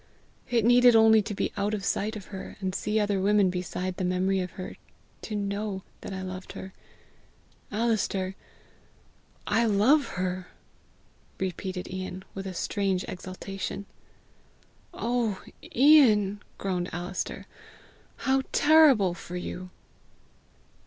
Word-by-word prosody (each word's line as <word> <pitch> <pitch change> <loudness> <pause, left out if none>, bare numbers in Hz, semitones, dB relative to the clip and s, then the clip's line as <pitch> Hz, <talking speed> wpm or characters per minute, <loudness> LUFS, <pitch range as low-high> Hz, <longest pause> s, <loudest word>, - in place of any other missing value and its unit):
It 235 -3 +2
needed 245 0 +7
only 220 -1 +7
to 210 0 -5
be - - -2
out 205 +1 0
of 195 -2 -5
sight 215 +3 -1
of 205 -3 -7
her, 190 - -7
and 190 -2 -2
see 210 +3 0
other 205 -2 +1
women 200 -1 +4
beside 180 0 -3
the - - -2
memory 185 +2 +1
of 180 0 -2
her, 185 - -7 0.5
to 215 - -5
know 200 -1 -3 0.2
that - - -7
I 190 0 -4
loved 185 0 -7
her. 190 0 -8 1.0
Alister, 205 -4 0 1.1
I 225 +3 +2
LOVE 230 +8 +4
HER!" 185 0 -3 0.9
repeated 185 0 -4
Ian 185 0 -5
with 195 0 -5
a 185 - -6
strange 195 -1 -1
exaltation. 190 +2 -6 1.1
"Oh, 235 -4 -1 0.3
Ian!" 225 -8 +6 0.2
groaned 180 -2 -2
Alister; 175 +2 -4 0.7
"how 265 0 +1
terrible 290 - +6
for 175 0 -8
you!" 180 +1 -6
195 Hz, 125 wpm, -27 LUFS, 185-220 Hz, 1.1 s, needed